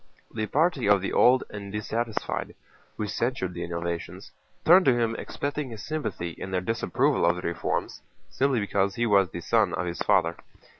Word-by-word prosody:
The 110 Hz, -1 st, -2 dB
party 150 Hz, -, +1 dB
of 100 Hz, -1 st, +6 dB
the 100 Hz, -, -3 dB
old 130 Hz, +1 st, +5 dB
and 100 Hz, -1 st, -7 dB
dissatisfied, 110 Hz, +2 st, -3 dB, 0.4 s
who 105 Hz, -, -2 dB
censured 105 Hz, -3 st, -2 dB
the 85 Hz, -, -5 dB
innovations, 85 Hz, 0 st, -5 dB, 0.3 s
turned 180 Hz, +3 st, +7 dB
to 125 Hz, -2 st, +4 dB
him 115 Hz, -1 st, 0 dB
expecting 145 Hz, +2 st, -4 dB
his 110 Hz, -3 st, -8 dB
sympathy 150 Hz, -, -3 dB
in 95 Hz, -, -7 dB
their 95 Hz, -1 st, 0 dB
disapproval 120 Hz, +8 st, 0 dB
of 85 Hz, -, +4 dB
the 90 Hz, -, -7 dB
reforms, 85 Hz, 0 st, -2 dB, 0.3 s
simply 135 Hz, -3 st, +1 dB
because 100 Hz, -1 st, 0 dB
he 120 Hz, -, 0 dB
was 100 Hz, -4 st, +4 dB
the 85 Hz, -, -6 dB
son 105 Hz, +1 st, +2 dB
of -, -, -2 dB
his 85 Hz, 0 st, -4 dB
father. 90 Hz, -5 st, +2 dB
105 Hz, 180 wpm, -26 LUFS, 90-125 Hz, 0.4 s, turned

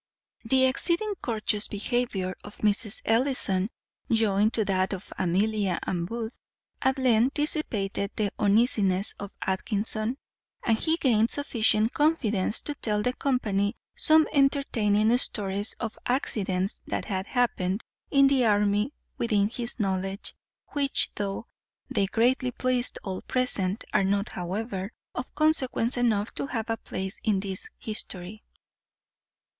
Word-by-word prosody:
The 260 Hz, +3 st, +4 dB
exceeding 340 Hz, +10 st, +2 dB
courteous 215 Hz, -3 st, 0 dB
behaviour 205 Hz, -4 st, -1 dB
of 205 Hz, -, -11 dB
Mrs. 210 Hz, 0 st, 0 dB
Ellison, 225 Hz, -5 st, +2 dB, 0.4 s
joined 215 Hz, -2 st, +3 dB
to 220 Hz, -, +1 dB
that 190 Hz, 0 st, +1 dB
of 190 Hz, 0 st, -7 dB
Amelia 195 Hz, +1 st, +1 dB
and 170 Hz, -2 st, -2 dB
Booth, 230 Hz, +2 st, -5 dB, 0.4 s
at 265 Hz, +1 st, +2 dB
length 250 Hz, 0 st, +3 dB
dissipated 215 Hz, -10 st, 0 dB
the 205 Hz, -2 st, 0 dB
uneasiness 205 Hz, -2 st, +3 dB
of 200 Hz, -, -5 dB, 0.2 s
Atkinson; 215 Hz, +5 st, -1 dB, 0.5 s
and 225 Hz, -, +3 dB
he 320 Hz, 0 st, +2 dB
gained 230 Hz, -7 st, +3 dB
sufficient 225 Hz, -6 st, +2 dB
confidence 230 Hz, -10 st, +1 dB
to 295 Hz, -, -3 dB
tell 210 Hz, -6 st, -1 dB
the 250 Hz, -, +1 dB
company 215 Hz, -8 st, 0 dB, 0.2 s
some 315 Hz, 0 st, +4 dB
entertaining 235 Hz, -6 st, +3 dB
stories 200 Hz, -3 st, 0 dB
of 225 Hz, -2 st, -4 dB
accidents 195 Hz, -7 st, 0 dB
that -, -, -2 dB
had 190 Hz, -2 st, -3 dB
happened 215 Hz, -5 st, 0 dB, 0.3 s
in 275 Hz, -1 st, +5 dB
the 270 Hz, -2 st, +4 dB
army 210 Hz, +4 st, +2 dB, 0.3 s
within 210 Hz, -3 st, +2 dB
his 240 Hz, +1 st, -4 dB
knowledge, 195 Hz, 0 st, -2 dB, 0.4 s
which, 280 Hz, -2 st, +1 dB
though 200 Hz, +2 st, -3 dB, 0.5 s
they 195 Hz, -, +2 dB
greatly 250 Hz, +5 st, +2 dB
pleased 250 Hz, 0 st, -1 dB
all 190 Hz, -2 st, -4 dB
present, 210 Hz, -6 st, -1 dB
are -, -, +4 dB
not, 200 Hz, +2 st, 0 dB
however, 190 Hz, +2 st, -4 dB, 0.2 s
of 250 Hz, -, -6 dB
consequence 275 Hz, -6 st, +2 dB
enough 225 Hz, -4 st, +1 dB
to -, -, -3 dB
have 225 Hz, -3 st, -3 dB
a 225 Hz, -, -1 dB
place 190 Hz, -2 st, -5 dB
in 210 Hz, -3 st, +2 dB
this 190 Hz, -1 st, -4 dB
history. 210 Hz, -1 st, -5 dB
215 Hz, 130 wpm, -27 LUFS, 200-250 Hz, 0.5 s, in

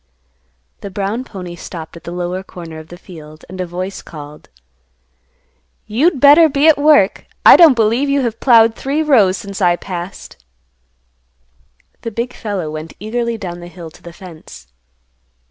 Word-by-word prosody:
The 200 Hz, -, -7 dB
brown 200 Hz, +5 st, -3 dB
pony 180 Hz, -7 st, -9 dB
stopped 165 Hz, -2 st, -9 dB
at 170 Hz, -, -13 dB
the 170 Hz, -, -6 dB
lower 180 Hz, +1 st, -4 dB
corner 170 Hz, -4 st, -10 dB
of 155 Hz, -, -12 dB
the 175 Hz, -, -11 dB
field, 155 Hz, -4 st, -13 dB
and 185 Hz, 0 st, -7 dB
a 180 Hz, -, -4 dB
voice 185 Hz, +3 st, -5 dB
called, 150 Hz, -1 st, -12 dB, 1.4 s
"You'd 280 Hz, +8 st, +1 dB
better 295 Hz, +4 st, +7 dB
be 280 Hz, +2 st, +2 dB
at 315 Hz, -2 st, +5 dB
work. 290 Hz, -10 st, +3 dB, 0.2 s
I -, -, +10 dB
don't 320 Hz, -6 st, +7 dB
believe 230 Hz, +5 st, +1 dB
you 280 Hz, 0 st, +1 dB
have 230 Hz, -3 st, -3 dB
ploughed 230 Hz, -3 st, +5 dB
three 280 Hz, +6 st, -2 dB
rows 215 Hz, -11 st, +3 dB
since 200 Hz, +2 st, -8 dB
I 175 Hz, -2 st, +3 dB
passed." 175 Hz, -, -8 dB, 1.6 s
The 230 Hz, -, -4 dB
big 235 Hz, +3 st, -4 dB
fellow 195 Hz, -8 st, -4 dB
went 155 Hz, +1 st, -8 dB
eagerly 235 Hz, +3 st, -3 dB
down 175 Hz, -5 st, -7 dB
the 175 Hz, -, -10 dB
hill 175 Hz, -2 st, -11 dB
to -, -, -19 dB
the 170 Hz, -, -11 dB
fence. 170 Hz, -, -13 dB
195 Hz, 160 wpm, -16 LUFS, 175-240 Hz, 1.6 s, I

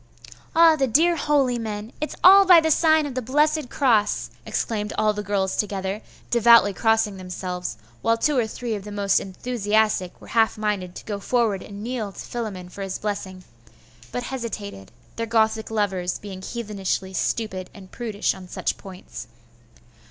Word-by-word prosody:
'Ah, 330 Hz, -1 st, +7 dB
the 275 Hz, -3 st, +1 dB
dear 330 Hz, +8 st, +4 dB
holy 280 Hz, -5 st, +1 dB
men! 215 Hz, 0 st, -5 dB
It's 305 Hz, -, -3 dB
all 390 Hz, +2 st, +9 dB
by 365 Hz, -3 st, +8 dB
the 320 Hz, 0 st, +1 dB
sign 315 Hz, 0 st, +4 dB
of 285 Hz, -, -5 dB
the 255 Hz, -, -2 dB
blessed 295 Hz, +3 st, +1 dB
cross!' 230 Hz, -7 st, +1 dB, 0.2 s
exclaimed 210 Hz, -2 st, -2 dB
all 215 Hz, 0 st, +2 dB
the 210 Hz, -, -4 dB
girls 195 Hz, -1 st, -1 dB
together, 195 Hz, 0 st, -2 dB, 0.3 s
devoutly 235 Hz, -3 st, +6 dB
crossing 220 Hz, -1 st, +1 dB
themselves, 180 Hz, -5 st, -5 dB, 0.2 s
while 230 Hz, 0 st, +2 dB
two 295 Hz, +5 st, +1 dB
or 240 Hz, -4 st, +2 dB
three 235 Hz, +1 st, -4 dB
of 205 Hz, -2 st, -4 dB
the 210 Hz, -, -8 dB
most 200 Hz, -1 st, +2 dB
enthusiastic 210 Hz, -2 st, -1 dB
were -, -, -14 dB
half 225 Hz, -1 st, +2 dB
minded 200 Hz, -4 st, -2 dB
to -, -, -9 dB
go 205 Hz, -2 st, -4 dB
forward 220 Hz, -3 st, 0 dB
and 205 Hz, 0 st, -9 dB
kneel 230 Hz, -4 st, -3 dB
to -, -, -12 dB
Philammon 210 Hz, -7 st, -5 dB
for 200 Hz, -, -9 dB
his 195 Hz, -1 st, -3 dB
blessing; 195 Hz, -3 st, -5 dB, 0.7 s
but 245 Hz, -, -3 dB
hesitated, 220 Hz, -, -6 dB, 0.3 s
their 230 Hz, 0 st, -2 dB
Gothic 220 Hz, -1 st, +1 dB
lovers 190 Hz, -5 st, -1 dB
being 195 Hz, -2 st, -9 dB
heathenishly 195 Hz, -3 st, -3 dB
stupid 190 Hz, -2 st, -2 dB
and 190 Hz, -2 st, -14 dB
prudish 220 Hz, -4 st, -1 dB
on 185 Hz, -1 st, -11 dB
such -, -, -2 dB
points. 185 Hz, -, -10 dB
215 Hz, 165 wpm, -23 LUFS, 195-240 Hz, 0.7 s, all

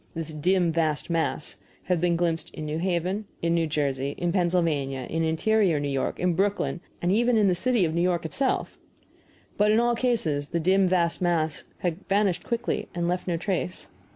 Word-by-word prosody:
This 160 Hz, -1 st, -4 dB
dim 175 Hz, +3 st, +2 dB
vast 160 Hz, 0 st, 0 dB
mass 165 Hz, -2 st, -1 dB, 0.3 s
had 180 Hz, -3 st, 0 dB
been 175 Hz, -1 st, +2 dB
glimpsed 165 Hz, -1 st, -1 dB
in 155 Hz, -, -5 dB
New 150 Hz, +1 st, -2 dB
Haven, 185 Hz, +3 st, -1 dB, 0.2 s
in 170 Hz, 0 st, +2 dB
New 165 Hz, -1 st, +1 dB
Jersey, 140 Hz, -2 st, -1 dB
in 175 Hz, -1 st, 0 dB
Pennsylvania, 165 Hz, -7 st, +1 dB
in 165 Hz, 0 st, -1 dB
interior 170 Hz, +1 st, +2 dB
New 145 Hz, -, -2 dB
York, 135 Hz, -1 st, -2 dB
in 180 Hz, -1 st, +2 dB
Brooklyn, 195 Hz, -1 st, 0 dB, 0.2 s
and 175 Hz, -, +2 dB
even 235 Hz, +3 st, +3 dB
in 210 Hz, -2 st, +4 dB
the 185 Hz, -, +4 dB
city 225 Hz, +2 st, +2 dB
of 160 Hz, -, -2 dB
New 170 Hz, -, +1 dB
York 175 Hz, -2 st, +1 dB
itself! 260 Hz, -, -1 dB, 0.8 s
But 210 Hz, +1 st, +4 dB
in 215 Hz, +1 st, +4 dB
all 240 Hz, 0 st, +3 dB
cases 210 Hz, -, 0 dB
the 170 Hz, -, -1 dB
dim 190 Hz, +3 st, +3 dB
vast 175 Hz, -2 st, +1 dB
mass 160 Hz, -4 st, 0 dB, 0.2 s
had 175 Hz, +2 st, -2 dB
vanished 195 Hz, -2 st, +2 dB
quickly 235 Hz, 0 st, -2 dB
and 170 Hz, -1 st, -1 dB
left 180 Hz, +1 st, -2 dB
no 170 Hz, -2 st, 0 dB
trace. 180 Hz, 0 st, -3 dB
175 Hz, 190 wpm, -26 LUFS, 160-190 Hz, 0.8 s, in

